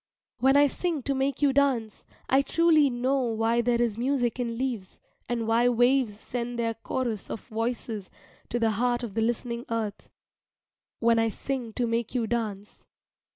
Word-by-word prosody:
When 265 +3 +5
I 290 - +7
sing 310 0 -2
to 280 - 0
make 270 +1 -1
you 280 -2 +4
dance, 265 -6 +1 0.2
I 265 +1 +4
truly 310 0 +4
know 255 +3 0
why 230 0 +1
there 235 0 +1
is 230 -2 0
music 250 -1 0
in 235 -2 -2
leaves, 240 -7 -4 0.3
and 235 -2 -1
why 235 +2 +4
waves 245 -2 +2
send 240 0 -4
their 230 -1 0
chorus 225 -1 -3
of 225 - -5
voices 225 -2 -3 0.4
to 240 - -1
the 225 -1 +2
heart 240 +3 0
of 225 -4 -5
the 225 - 0
listening 235 +1 -1
earth 220 -3 -3 0.9
when 230 0 +4
I 225 0 +2
sing 250 +1 -4
to 245 - 0
make 230 +1 -2
you 240 -2 +1
dance. 215 -3 -4
240 Hz, 170 wpm, -27 LUFS, 225-260 Hz, 0.9 s, I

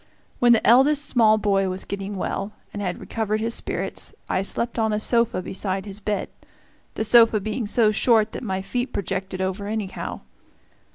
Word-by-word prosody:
When 240 -1 +5
the 230 - +4
eldest 280 +5 +5
small 220 -3 +4
boy 195 -2 +1
was 185 +1 -3
getting 200 0 -5
well, 195 +2 -3 0.2
and 205 - -5
had 180 -3 -3
recovered 215 -1 -2
his 230 +1 -1
spirits, - - -3
I - - 0
slept 235 +4 0
on 220 -1 +1
a 210 - 0
sofa 230 -4 +1
beside 190 +1 -2
his 200 0 -6
bed 205 -1 -2 0.7
the - - -1
sofa 225 -1 +6
being 215 +2 -3
so 220 0 +3
short 220 0 +3
that - - -6
my 190 -4 -3
feet 245 +5 -3
projected 190 0 -3
over 190 +2 -3
anyhow. 210 -3 -4
210 Hz, 175 wpm, -23 LUFS, 195-230 Hz, 0.7 s, sofa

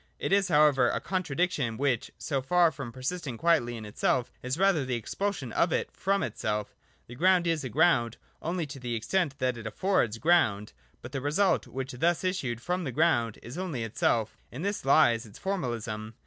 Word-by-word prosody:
It - - -1
is 200 -1 +4
however 150 -6 +4
a - - -1
contra 185 -7 -3
diction 145 -10 0
which, 135 -4 0
so 140 -3 -2
far 170 +4 +3
from 135 -6 -7
persisting 130 +1 -4
quietly 150 -7 +2
in 110 - -8
itself, 120 +4 0
is 130 +3 -3
rather 190 -5 +3
the 130 -1 -2
expulsion 135 - -3
of 170 - +2
it - - -1
from 195 +1 0
itself 105 -1 -3 0.3
The 120 - -11
ground 180 +6 +3
is 165 -3 0
a 130 - -4
ground 130 -5 +2 0.2
only 170 +1 -2
to 140 -1 -9
the 120 -2 -3
extent 140 +6 -1
that 125 -2 0
it 115 - -6
affords 115 - 0
ground: 110 -10 +2 0.3
but 120 - -8
the 135 -1 -3
result 155 +8 +1
which 135 +1 -5
thus 165 +9 +1
issued 130 -11 -2
from 180 +1 -1
the 135 - -3
ground 120 -7 +2
is 125 +9 -7
only 160 -11 -3
itself 110 0 0 0.2
In 130 +8 -6
this 200 +1 -2
Ues 120 -5 +4
its 100 - -14
formalism. 115 - -3
135 Hz, 190 wpm, -28 LUFS, 120-175 Hz, 0.3 s, is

